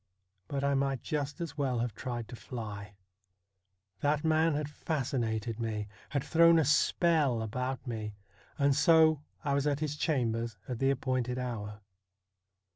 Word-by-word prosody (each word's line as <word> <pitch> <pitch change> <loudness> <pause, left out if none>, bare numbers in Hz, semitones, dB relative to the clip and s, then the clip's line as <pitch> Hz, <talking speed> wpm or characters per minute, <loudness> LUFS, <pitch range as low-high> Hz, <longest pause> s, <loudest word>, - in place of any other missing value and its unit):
But 140 -1 -2
I 140 0 +2
might 135 -2 0
just 150 0 -2
as 160 -3 -5
well 130 -3 +1
have 115 -1 -1
tried 120 0 -5
to - - -7
fly. 105 -4 -7 1.0
That 145 +1 +1
man 160 0 +3
had 150 0 -1
fascinated 120 -7 -2
me; 110 -2 -2 0.2
had 140 -2 -1
thrown 165 +2 +6
a 160 - +3
spell 150 -4 +3
about 125 +5 -3
me, 110 -4 -4 0.4
and 140 -2 +3
so 160 -3 +5 0.2
I 140 -2 0
was 140 +1 +1
at 145 -1 +1
his 150 -1 -2
chambers 115 - -1
at 125 -3 -4
the 135 - +3
appointed 130 -2 0
hour. 105 -4 -4
135 Hz, 150 wpm, -31 LUFS, 115-150 Hz, 1.0 s, thrown